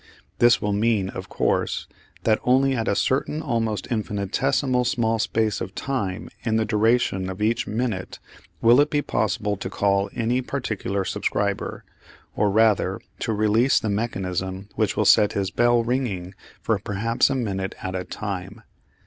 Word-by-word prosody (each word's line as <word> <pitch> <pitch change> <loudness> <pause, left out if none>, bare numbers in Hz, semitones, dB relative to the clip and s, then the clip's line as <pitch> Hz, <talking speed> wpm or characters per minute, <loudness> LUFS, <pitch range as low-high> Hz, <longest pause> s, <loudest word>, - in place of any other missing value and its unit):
This 120 -1 +6
will 105 -1 -1
mean, 105 -2 +1
of - - -7
course, - - 0 0.4
that 110 -1 +3
only 135 +2 +3
at 115 -2 -2
a 100 - +2
certain 140 +6 0
almost 115 -5 -1
infinitesimally 125 +5 0
small 115 -2 +1
space 110 -1 0
of 95 - -5
time 105 -10 -3 0.2
in 110 -2 0
the 110 0 +2
duration 110 -3 +1
of 95 +1 -6
each 110 +2 0
minute 110 -4 -3 0.5
will 120 +4 +7
it 145 - +2
be 145 -1 0
possible 105 0 -1
to - - -5
call 100 0 +1
any 120 +2 0
particular 110 -7 -3
subscriber, 100 +1 -2 0.5
or 105 - +2
rather 110 0 +2 0.2
to - - -2
release 110 +4 +3
the 110 - -3
mechanism 95 -3 -3
which - - 0
will - - +2
set 105 - +5
his 95 -1 -1
bell 120 0 +3
ringing 115 -7 -2 0.3
for 110 -3 +1
perhaps 110 +3 +1
a 135 - 0
minute 95 -6 -2
at 95 - -3
a 90 0 -2
time. 100 +2 -6
110 Hz, 155 wpm, -24 LUFS, 100-120 Hz, 0.5 s, will